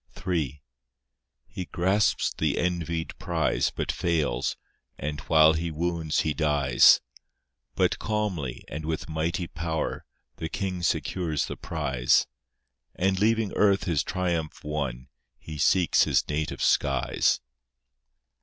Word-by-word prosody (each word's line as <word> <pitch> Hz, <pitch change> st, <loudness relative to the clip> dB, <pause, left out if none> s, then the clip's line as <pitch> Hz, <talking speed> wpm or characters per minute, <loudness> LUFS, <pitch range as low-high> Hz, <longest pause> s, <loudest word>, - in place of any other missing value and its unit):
III 75 Hz, -6 st, -1 dB, 0.8 s
He 95 Hz, -2 st, -6 dB
grasps 95 Hz, +5 st, +1 dB
the 75 Hz, -3 st, 0 dB
envied 85 Hz, -2 st, -2 dB
prize, -, -, 0 dB
but -, -, -3 dB
fails, 80 Hz, -7 st, -1 dB, 0.4 s
And 75 Hz, +1 st, -4 dB
while 80 Hz, 0 st, +6 dB
he 85 Hz, +2 st, -2 dB
wounds, 80 Hz, -1 st, -1 dB
he 80 Hz, -, 0 dB
dies; 75 Hz, -5 st, +5 dB, 0.7 s
But -, -, +1 dB
calmly, 105 Hz, -, -2 dB
and 80 Hz, -, -6 dB
with 80 Hz, 0 st, -3 dB
mighty 80 Hz, +2 st, -2 dB
power, 80 Hz, -1 st, -3 dB, 0.3 s
The 80 Hz, -, -4 dB
King 95 Hz, +1 st, -3 dB
secures 80 Hz, -1 st, 0 dB
the -, -, -6 dB
prize; 65 Hz, -6 st, +1 dB, 0.7 s
And, 95 Hz, +1 st, +1 dB
leaving 110 Hz, 0 st, +2 dB
earth, 100 Hz, -2 st, +3 dB
His 85 Hz, -6 st, +1 dB
triumph 85 Hz, -4 st, -2 dB
won, 70 Hz, -4 st, -3 dB, 0.3 s
He 80 Hz, -2 st, -9 dB
seeks 90 Hz, +3 st, +4 dB
His -, -, +1 dB
native 75 Hz, +1 st, -2 dB
skies. 70 Hz, -3 st, +2 dB
80 Hz, 115 wpm, -26 LUFS, 75-90 Hz, 0.8 s, while